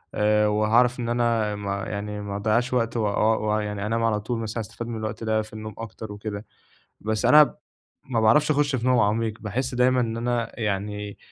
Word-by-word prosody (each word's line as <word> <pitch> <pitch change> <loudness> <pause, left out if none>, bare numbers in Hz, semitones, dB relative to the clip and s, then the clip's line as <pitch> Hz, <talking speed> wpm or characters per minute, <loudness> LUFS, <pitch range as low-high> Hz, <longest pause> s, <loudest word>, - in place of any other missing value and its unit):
آآ 105 0 +3
وهاعرف 115 +4 +3
إن 115 - -2
أنا 115 -3 +1
ما 100 -1 -3
يعني 105 0 -4
ما 100 -1 -5
أضيّعش 110 +5 0
وقت 115 -1 0
وآه 110 0 +2
و 105 0 0
ويعني 105 -1 -2
أنام 115 +2 0
على 110 -2 +2
طول 115 +3 -3
مثلًا 115 +1 -3
أستفاد 110 +2 -7
من 115 - -4
الوقت 110 +1 -5
ده 110 -1 +1
في 110 0 -11
النوم 110 0 -7
أكتر 110 -1 -7
وكده. 105 0 -6 0.6
بس 110 +2 -2
أنا 150 +5 +8
ب - - 0 0.5
ما 120 -4 -1
باعرفش 110 +8 +4
أخُش 145 -2 +2
في 120 0 -3
نوم 125 -2 +4
عميق، 110 +1 +1
باحس 125 +5 -3
دايمًا 125 +1 +3
إن 115 -2 -1
أنا 120 0 -2
يعني 105 -1 -3
110 Hz, 200 wpm, -25 LUFS, 105-120 Hz, 0.6 s, أنا